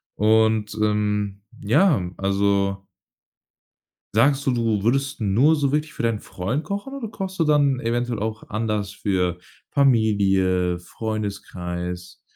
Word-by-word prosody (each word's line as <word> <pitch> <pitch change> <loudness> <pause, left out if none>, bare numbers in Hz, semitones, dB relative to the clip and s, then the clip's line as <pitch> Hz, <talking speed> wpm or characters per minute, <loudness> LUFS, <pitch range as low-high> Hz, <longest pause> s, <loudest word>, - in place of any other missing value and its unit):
Und, 110 0 +2
ähm, 105 -1 0 0.2
ja, 115 - +2
also 100 0 0 1.3
sagst 135 +6 +3
du, - - +4
du 115 -4 0
würdest 135 +5 0
nur 115 +9 +3
so 140 -3 0
wirklich 150 +1 -1
für - - -5
deinen 115 -2 +1
Freund 115 - -3
kochen 200 - -5
oder 260 -6 -5
kochst 190 -3 -6
du - - +4
dann 145 -4 +3
eventuell 120 0 -1
auch 110 +1 -4
anders 105 -2 -2
für 90 -4 -1 0.3
Familie, 95 -9 +2
Freundeskreis 90 -3 -5
110 Hz, 120 wpm, -23 LUFS, 100-135 Hz, 1.3 s, du